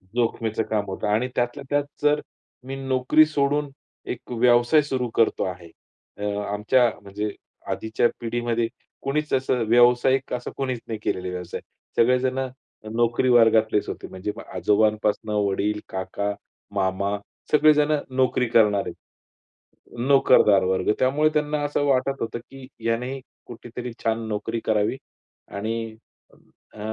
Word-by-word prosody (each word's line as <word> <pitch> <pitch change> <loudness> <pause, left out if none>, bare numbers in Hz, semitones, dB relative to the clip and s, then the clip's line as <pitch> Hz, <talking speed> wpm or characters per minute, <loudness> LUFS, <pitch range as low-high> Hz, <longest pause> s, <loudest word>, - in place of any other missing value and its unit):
जोखमीचं 115 -2 0
काम 105 -2 0
होतं. 95 +1 -4
आणि 110 +4 +1
त्यातल्या 120 +4 -1
त्यात 145 0 +2 0.2
जर 150 0 +3 0.5
मी 135 - -4
नोकरी 135 +3 +3
सोडून 145 -1 0 0.4
एक 125 - -13
व्यवसाय 120 +5 +4
सुरू 130 -4 -2
करतो 115 - +2
आहे. 90 -2 -6 0.5
अ, 105 - -7 0.3
आमच्या 120 +4 +3
म्हणजे 100 +1 -4 0.4
आधीच्या 110 +2 +1
पिढीमध्ये 120 0 -1 0.3
कुणीच 150 +2 -2
असं 130 -2 +1
व्यावसायिक 120 +3 +4
असा 125 0 -4
कोणीच 130 -3 -2
नाही 110 -2 -4
केलेला 90 0 -2
व्यवसाय. 90 -1 -5 0.4
सगळेजणं 130 +2 +2 0.5
नोकरी 120 +2 +2
वर्गातलेच 115 -3 +4
होते. - - -6
म्हणजे 95 +2 -5 0.2
आजोबांपासून 105 0 +1 0.2
वडील, 105 +2 0
काका, 100 +2 -3 0.4
मामा 100 +1 0 0.3
सगळेजणं 150 -1 +4
नोकरी 130 -1 +2
करणारे 105 -4 +3 1.2
नोकरदार 110 -7 +5
वर्ग. 95 +2 +1
त्यामुळे 145 +4 +3
त्यांना 150 0 0
असं 145 0 0
वाटत 135 0 +1
होतं 115 +1 -3
की 135 -1 -11 0.2
याने 125 +4 -1 0.3
कुठेतरी 120 +1 -7
छान 115 0 0
नोकरी 110 +2 -2
करावी 110 +3 +1 0.6
आणि 110 +2 -3 0.8
अ, - - -13
120 Hz, 125 wpm, -24 LUFS, 105-130 Hz, 1.2 s, नोकरदार